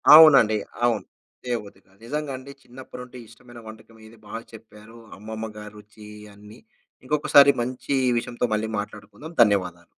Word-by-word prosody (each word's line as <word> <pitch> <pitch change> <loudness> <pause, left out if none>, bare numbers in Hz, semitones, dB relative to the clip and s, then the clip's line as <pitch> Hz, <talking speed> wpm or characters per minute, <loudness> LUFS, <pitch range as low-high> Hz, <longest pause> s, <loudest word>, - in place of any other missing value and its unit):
అవునండి, 140 -9 +8 0.3
అవును. 115 -3 0 0.4
చేయబుద్ధి 110 -6 -5
కాదు. 95 +1 -28
నిజంగండి 140 -1 -5
చిన్నప్పటినుండి 125 0 -12
ఇష్టమైన 120 +2 -15
వంటకం 110 +1 -14
ఇది 115 - -17
బాగా 115 +2 -7
చెప్పారు. 110 +1 -15 0.2
అమ్మమ్మ 110 +2 -7
గారి 105 0 -10
రుచి 105 0 -15 0.3
అన్నీ, 105 +1 -15 0.5
ఇంకొకసారి 140 0 +5
మంచి 130 +3 -3 0.2
విషయంతో 120 +1 -2
మళ్ళీ 110 +1 -3
మాట్లాడుకుందాం. 105 +9 -9
ధన్యవాదాలు. 90 -5 -1
110 Hz, 125 wpm, -23 LUFS, 105-125 Hz, 0.5 s, అవునండి